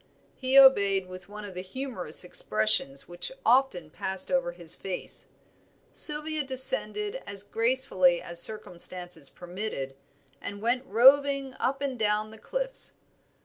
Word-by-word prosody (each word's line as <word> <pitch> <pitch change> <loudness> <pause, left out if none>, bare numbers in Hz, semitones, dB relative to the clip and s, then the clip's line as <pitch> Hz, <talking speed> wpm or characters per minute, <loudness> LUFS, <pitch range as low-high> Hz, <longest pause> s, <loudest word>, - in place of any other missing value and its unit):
He 260 +1 -1
obeyed 200 -8 +4
with 185 +1 -12
one 210 0 -10
of 200 - -10
the 180 - -7
humorous 190 - +1
expressions 110 -3 +1
which 175 - -6
often 235 - +1
passed 190 +2 -3
over 265 -10 -1
his 170 -2 -2
face. 190 -2 -8 0.7
Sylvia 305 0 +3
descended 415 - 0
as 200 -1 -7
gracefully 225 -6 +1
as 170 0 +1
circumstances 180 -6 0
permitted, 175 -7 -7 0.5
and 200 0 -8
went 250 +4 -2
roving 275 +3 +3
up 275 +2 -2
and 265 -4 -5
down 215 0 -1
the 220 - -14
cliffs. - - -3
210 Hz, 130 wpm, -26 LUFS, 180-265 Hz, 0.7 s, obeyed